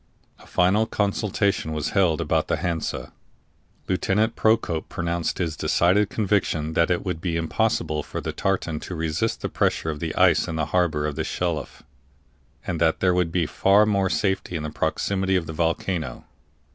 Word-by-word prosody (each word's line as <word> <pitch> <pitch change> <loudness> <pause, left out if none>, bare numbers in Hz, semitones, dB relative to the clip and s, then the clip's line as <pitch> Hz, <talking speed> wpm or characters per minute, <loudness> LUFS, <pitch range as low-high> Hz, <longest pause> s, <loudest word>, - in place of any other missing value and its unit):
A - - -17
final 100 +5 +2
consultation 100 -5 0
was 75 -1 -2
held 95 -7 +2
about - - 0
the - - 0
Hansa. 85 -2 -3 0.7
Lieutenant 100 +4 +1
Procope 110 -7 +1
pronounced 85 -1 -2
his 85 -3 -2
decided 90 +6 +2
conviction 95 -8 0
that 85 +2 +2
it 90 - 0
would 90 -3 -3
be 85 -2 -1
impossible 80 -3 0
for - - -6
the - - -4
tartan 90 -5 -1
to 90 - -7
resist 80 -1 -1
the - - -1
pressure 80 - 0
of 75 - -7
the 80 0 -3
ice - - +4
in 80 - -3
the 80 -1 0
harbor 85 -5 +2
of 75 -2 -2
the - - 0
Shelif, 85 -3 -3 0.8
and 85 -2 -3
that 80 -1 +3
there 90 -1 +3
would 90 -2 +1
be 85 -1 +1
far 100 +7 +4
more 100 -2 +1
safety 95 -3 -1
in 80 - -3
the 75 - -4
proximity 95 +5 0
of 90 -3 +1
the 80 - -6
volcano. 80 -3 -2
85 Hz, 175 wpm, -24 LUFS, 80-95 Hz, 0.8 s, ice